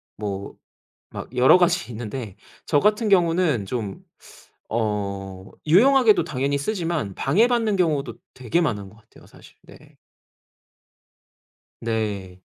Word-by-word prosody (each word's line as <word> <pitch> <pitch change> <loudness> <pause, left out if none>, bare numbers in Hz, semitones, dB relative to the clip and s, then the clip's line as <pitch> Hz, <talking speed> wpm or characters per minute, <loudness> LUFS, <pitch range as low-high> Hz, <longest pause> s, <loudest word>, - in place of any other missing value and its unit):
뭐 100 -1 -5 0.6
막 125 - -9
여러 125 +7 +6
가지 175 -5 +1
있는데 110 -2 -6 0.3
저 145 - +2
같은 210 +3 +2
경우는 170 - +2
좀 105 -2 -5 0.7
어 100 -4 -3 0.2
유용하게도 230 - +5
당연히 140 +2 -1
쓰지만 165 - -2
방해받는 220 - +2
경우도 155 -6 0 0.2
되게 130 +6 -1
많은 105 - -2
것 110 - -19
같아요, 110 - -20
사실. - - -18
네. - - -18 1.8
네. 105 -5 -3
130 Hz, 225 characters per minute, -23 LUFS, -, 1.8 s, 여러